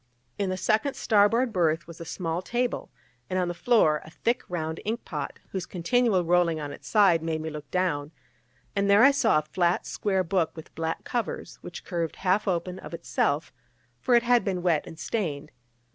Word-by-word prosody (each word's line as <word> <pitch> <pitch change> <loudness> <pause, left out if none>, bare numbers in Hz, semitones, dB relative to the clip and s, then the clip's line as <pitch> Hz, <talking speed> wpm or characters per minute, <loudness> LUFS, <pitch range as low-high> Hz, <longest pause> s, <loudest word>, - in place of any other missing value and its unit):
In 200 -2 0
the 185 - -2
second 220 +8 +1
starboard 225 +3 +3
berth 165 -2 +1
was 170 0 -11
a - - -6
small 165 0 -3
table, 240 +5 -2 0.4
and 185 - -1
on 180 -1 +1
the - - -2
floor 170 -7 +3
a - - -12
thick 235 +9 -1
round 160 -2 -3
ink 225 +3 -3
pot, - - -5
whose 190 -2 -4
continual 190 +1 +1
rolling 170 -2 +3
on 145 -1 -5
its - - -12
side 195 -6 +4
made 160 -1 -2
me 160 0 -4
look 150 -2 -8
down; 155 -5 -1 0.6
and 200 0 +1
there 200 +3 +7
I 275 - +8
saw 240 - +3
a - - +3
flat 175 +3 0
square 190 -2 0
book 175 -1 0
with 160 - -11
black 165 0 -3
covers, 235 -4 -4
which 175 - -9
curved 170 -3 -2
half 190 +3 +1
open 180 0 -1
of 170 - -7
itself, 150 -1 -1 0.5
for 245 - +3
it 235 - +5
had 245 0 +4
been 185 -3 -2
wet 170 -4 +1
and 165 - -10
stained. 165 -6 -3
180 Hz, 195 wpm, -27 LUFS, 165-210 Hz, 0.6 s, I